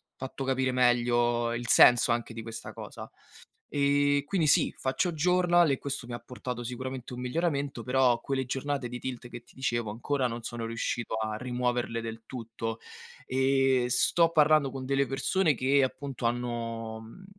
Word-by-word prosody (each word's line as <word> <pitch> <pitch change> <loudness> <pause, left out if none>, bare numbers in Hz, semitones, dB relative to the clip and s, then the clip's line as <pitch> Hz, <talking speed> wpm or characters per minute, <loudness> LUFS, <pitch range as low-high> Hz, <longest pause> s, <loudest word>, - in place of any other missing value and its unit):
fatto 135 +1 -6
capire 130 0 +1
meglio 120 -1 +2
il 120 +1 -4
senso 120 -1 +6
anche 120 0 -3
di 115 - -6
questa 115 0 -7
cosa. - - -9 0.6
Ehm, 145 0 +2
quindi 165 +1 0
sì, - - +3
faccio 135 +7 0
journal 175 +1 +3
e 135 - 0
questo 140 -3 -5
mi 120 - -7
ha 120 - -4
portato 125 -1 -6
sicuramente 125 +1 -6
un 125 - -6
miglioramento, 140 -1 -1
però 125 -1 +3
quelle 135 0 -2
giornate 135 0 -2
di 125 +1 -6
tilt 125 -1 -6
che 120 -1 -9
ti - - -23
dicevo 120 -4 -1
ancora 130 +4 -1
non 120 -1 -6
sono 115 0 -5
riuscito 115 0 -3
a 110 -1 -2
rimuoverle 125 -1 -1
del 115 0 -6
tutto. 115 -2 -5 0.5
Ehm, 130 -1 +2
sto 165 +6 +3
parlando 155 -3 +4
con 130 0 -6
delle 140 +1 +1
persone 145 +4 +1
che, 135 +3 +3
appunto, 130 -1 -4
hanno, 115 -2 -3
mhmm, 115 +13 -13
125 Hz, 165 wpm, -29 LUFS, 120-140 Hz, 0.6 s, senso